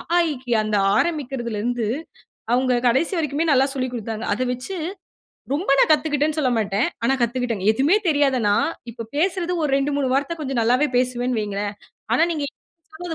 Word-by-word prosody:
ஆ, - - +5
ஈக்கி" 255 -3 -7
ஆ 215 - +3
அந்த 210 -1 +1 0.2
ஆரம்பிக்கிறதில 265 -9 -1
இருந்து 240 -2 -1 0.7
அவுங்க 255 0 +2
கடைசி 270 +10 +2
வரைக்குமே 310 0 0
நல்லா 265 -1 +5
சொல்லிக் 255 -2 -2
குடுத்தாங்க. 225 -1 -4
அத 220 - -3
வெச்சி 250 +10 -6 0.8
ரொம்ப 345 +7 -3
நான் - - +5
கத்துக்கிட்டேன்னு 300 0 +1
சொல்ல 265 -4 +2
மாட்டேன். 210 0 +1 0.2
ஆனா, 250 +3 +3
கத்துக்கிட்டேங்க. 235 -4 -1
எதுவுமே 275 - +3
தெரியாத 285 -4 +3
நான், 205 - +3 0.2
இப்ப 230 0 -7
பேசுறது 360 +2 0
ஒரு 300 - 0
2 275 +1 0
3 280 -2 0
வார்த்த 285 +5 0
கொஞ்சம் 270 -5 -2
நல்லாவே 250 +6 +3
பேசுவேன்னு 250 -1 0
வெயுங்களேன். 205 0 -3 0.4
ஆனா, 255 - +4
நீங்க 305 -4 -2
என்னா - - -66 0.4
சொன்னாலும் 340 +1 -5
260 Hz, 175 wpm, -22 LUFS, 235-300 Hz, 0.8 s, ஆ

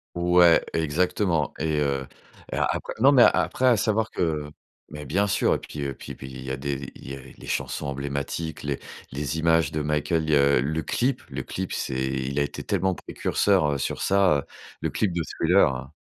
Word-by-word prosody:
Ouais, 85 -1 +5
exactement 80 0 +1
et 80 -1 0
heu 70 -2 -1 0.4
et - - -2
a - - +2
après - - -4
non, 135 +4 +6
mais 130 -4 +6
après, 130 - 0
à 120 -3 +5
savoir 110 +1 +1
que 75 -4 -1 0.4
mais 75 -1 -7
bien 100 +9 +1
sûr, - - +2
et - - -1
puis 75 - -8
et 70 -1 -2
puis - - -9
puis 65 - -9
il 65 0 -8
y 65 - -6
a 65 - -2
des 70 -1 -4
il - - -10
y 70 - -4
a - - -10
les 65 - -14
chansons 75 - -3
emblématiques, 70 +4 -4
les 70 -1 -2 0.3
les 75 +3 -3
images 80 -2 +3
de 75 - -2
Michael, 75 +2 0
heu, 70 -3 +4
le 80 +4 -1
clip, 130 - 0
le 65 -1 -4
clip, 95 0 -5
c'est 65 0 -2
il 65 +1 -2
a - - +3
été 70 - -5
tellement 95 -2 0
précurseur, 90 -8 +1
heu, - - -1
sur - - -3
ça, 95 -5 +4
heu, 70 - -5 0.4
le - - 0
clip 95 -5 0
de 85 - -1
Thriller. - - +2
75 Hz, 205 wpm, -25 LUFS, 70-90 Hz, 0.4 s, non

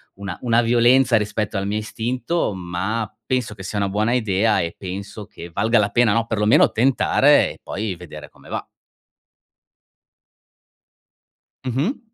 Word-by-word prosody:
una 100 -3 -6
una 120 -1 +3
"violenza" 120 +2 +4
rispetto 105 0 -2
al 95 - -2
mio 105 - -1
istinto 120 +9 -2
ma, 95 +5 -3 0.2
penso 125 -4 -1
che 95 - -10
sia 100 +2 -4
una 100 - +1
buona 105 +4 0
idea 110 -2 +2
e 85 0 -4
penso 100 +3 -7
che 85 -2 -11
valga 110 +6 +2
la 100 -1 +1
pena, 120 -2 +3
no, 115 +1 +1
perlomeno 105 -1 +3
tentare 125 +4 +3
e - - -20
poi 100 -2 -4
vedere 80 -3 -10
come - - -18
va. - - -4 3.0
Mh-mh. 135 - -1
110 Hz, 145 wpm, -21 LUFS, 100-120 Hz, 3.0 s, violenza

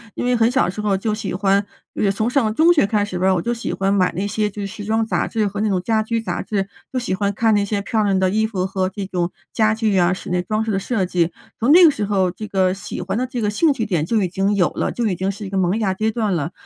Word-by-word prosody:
因 - - -3
为 250 - +2
很 230 -1 +3
小 265 +2 +2
的 180 - -1
时 210 - -9
候 205 -2 +1
就 210 +2 -1
喜 210 -4 -4
欢， 195 +1 +2 0.4
而 - - -6
且 - - +2
就 195 - +3
从 215 +4 -1
上 235 -5 +1
中 330 +2 +5
学 290 -11 +3
开 210 -2 +1
始 180 -3 -4
吧， 190 +1 +3
我 170 - 0
就 240 - -1
喜 230 - -4
欢 195 +1 0
买 185 -2 +2
那 195 +3 -1
些 210 0 -1
就 205 +1 -7
是 200 - -3
时 205 0 -8
装 220 +1 +1
杂 - - -1
志 220 -2 0
和 200 +1 -5
那 215 - +1
种 185 -3 0
家 220 0 +1
居 230 +1 -2
杂 - - -3
志， 200 -2 -2 0.2
就 - - -1
喜 240 -7 -1
欢 200 +1 0
看 225 +1 +2
那 205 -1 +2
些 200 0 -2
漂 215 +2 0
亮 195 -2 +2
的 185 0 +2
衣 220 +2 +1
服 185 -4 -2
和 190 -1 -1
这 195 +1 -5
种 175 -2 -1 0.2
家 215 -1 +2
具 215 -4 +1
啊， 175 +1 +3
室 185 - -7
内 180 0 +1
装 215 +4 -1
饰 220 - -2
的 195 - 0
设 200 -2 -1
计。 175 -2 0 0.3
从 255 +7 +4
那 360 +1 +8
个 320 - +8
时 210 -6 -3
候 190 -3 +1
这 215 +3 -8
个 185 -2 +1
喜 190 -1 -6
欢 190 +4 -3
的 255 +1 -1
这 245 -2 -4
个 210 - +1
兴 290 +8 +2
趣 225 - -2
点 170 -6 0
就 220 +2 +1
已 180 - -1
经 195 +3 0
有 180 -3 +3
了， - - -2
就 235 -2 -1
已 185 - 0
经 190 +2 -2
是 200 +1 -5
一 - - -6
个 195 - -2
萌 185 +3 +1
芽 195 -3 +1
阶 215 +3 0
段 215 -3 -1
了。 160 0 -2
205 Hz, 340 characters per minute, -20 LUFS, 190-220 Hz, 0.4 s, 那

